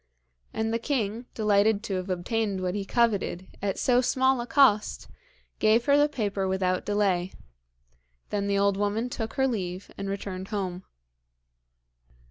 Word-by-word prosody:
And 220 0 -2
the 230 - 0
king, 235 -2 -2
delighted 210 0 +2
to 195 -4 -2
have 185 +1 -5
obtained 195 +2 -1
what 180 -1 -1
he 200 -1 -3
coveted 205 -6 0 0.2
at 195 -1 -1
so 250 -1 +3
small 260 0 +2
a 240 - -6
cost, 250 -8 +3 0.5
gave 220 +2 +3
her 280 - +5
the 290 +1 +4
paper 205 -7 -2
without 185 -1 0
delay. 195 -3 +1 1.0
Then 200 -1 -1
the 200 0 +1
old 200 0 +2
woman 210 +4 -1
took 225 -1 -4
her 265 - +1
leave 190 -6 -4
and 195 0 -3
returned 195 -1 -5
home. 190 -3 -4
205 Hz, 150 wpm, -27 LUFS, 190-230 Hz, 1.0 s, her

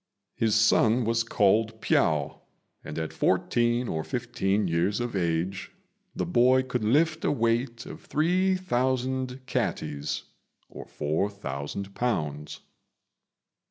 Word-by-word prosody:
His 110 -2 +1
son 110 +2 +4
was 115 0 +1
called 110 +1 +2
Piao, 75 -8 +1 0.4
and 75 - -7
at 80 -1 -3
fourteen 120 +1 +1
or 80 -5 -2
fifteen 110 -5 -1
years 85 +5 0
of 120 -3 -3
age 90 +2 -1 0.4
the - - -1
boy 130 -5 +4
could 125 -3 -3
lift 155 +8 +2
a - - +2
weight 115 -1 0
of - - -9
three 180 +5 +1
thousand 130 -5 -1
catties 75 - -2 0.5
(4,000 80 +4 -4
lbs.). 75 -12 -2
115 Hz, 110 wpm, -27 LUFS, 95-125 Hz, 0.5 s, son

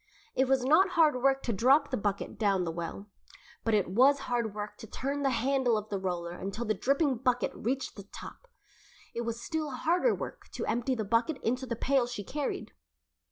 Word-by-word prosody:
It 265 - +2
was 260 -1 +2
not 320 +8 +5
hard 310 -5 +5
work 270 +1 +3
to 235 - -1
drop 270 +8 +4
the - - +1
bucket 205 -1 -2
down 200 -4 +2
the 165 - -2
well, 170 +4 -5 0.6
but 225 -1 +2
it 205 - +2
was 265 +9 +4
hard 235 -5 -1
work 210 0 -5
to 225 - -10
turn 280 +6 -3
the 275 - +2
handle 255 -1 +2
of 210 0 -5
the 200 - -2
roller 175 -2 -3
until 195 +6 -4
the 215 - +1
dripping 275 - +1
bucket 245 0 +1
reached 260 +4 -2
the 200 -1 -10
top. - - -10 0.7
It 235 - -2
was 230 -1 -3
still 315 +2 -2
harder 345 - +2
work - - -7
to - - -3
empty 240 +3 0
the 220 -3 -2
bucket 230 +8 +1
into 255 +3 -1
the 235 - -2
pail 255 +1 +2
she 240 -4 -5
carried. 285 +7 -3
245 Hz, 205 wpm, -30 LUFS, 210-275 Hz, 0.7 s, not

